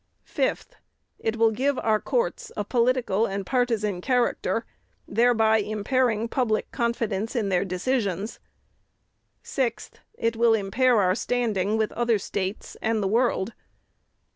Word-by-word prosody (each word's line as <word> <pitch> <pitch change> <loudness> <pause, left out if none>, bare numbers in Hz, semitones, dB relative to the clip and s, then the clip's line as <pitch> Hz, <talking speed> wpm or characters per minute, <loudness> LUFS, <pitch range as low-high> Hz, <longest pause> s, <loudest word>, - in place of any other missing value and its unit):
"5th. - - -1 0.5
It 225 0 -1
will 225 -1 +4
give 265 +5 0
our 215 -1 +2
courts 480 - -2
a 210 - 0
political 235 -2 +1
and 195 0 -4
partisan 220 -6 0
character, 245 +2 0 0.4
thereby 225 -2 +3
impairing 220 +2 0
public 230 -3 -1
confidence 230 -2 -1
in 215 -5 0
their 185 -1 +2
decisions. 200 +1 -2 1.0
"6th. 245 -5 -2 0.2
It 230 - -1
will 230 0 +4
impair 225 +4 +2
our 185 -2 +3
standing 220 -3 0
with 220 -1 0
other 235 -2 +1
States 195 0 -4
and 220 -1 0
the - - +1
world. 230 -1 +1
225 Hz, 125 wpm, -25 LUFS, 205-245 Hz, 1.0 s, will